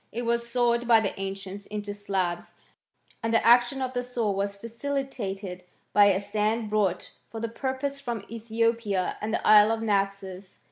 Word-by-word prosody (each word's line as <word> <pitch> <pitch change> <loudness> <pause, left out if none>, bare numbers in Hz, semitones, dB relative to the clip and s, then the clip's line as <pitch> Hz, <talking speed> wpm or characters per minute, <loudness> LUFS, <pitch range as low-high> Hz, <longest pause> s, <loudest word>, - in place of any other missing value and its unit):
It 240 +2 -4
was 235 0 -1
sawed 240 -1 +1
by 230 -2 +7
the 200 -3 -1
ancients 195 +1 -6
into 205 -1 -5
slabs, 190 -4 -2 0.7
and 225 - -1
the 230 - +2
action 245 +3 +5
of 255 0 -3
the 245 - -1
saw 245 -4 -1
was 200 +1 -2
facilitated 225 -6 -4 0.3
by 205 -1 +7
a 195 -2 +4
sand 210 +2 -1
brought 200 -4 0 0.2
for 225 - -7
the 230 - -2
purpose 265 +4 -3
from 235 -7 -5
Ethiopia 230 -3 -1
and 215 +1 -2
the - - -2
isle 215 0 +7
of 225 0 -1
Naxos. 195 -2 -2
220 Hz, 170 wpm, -27 LUFS, 200-235 Hz, 0.7 s, by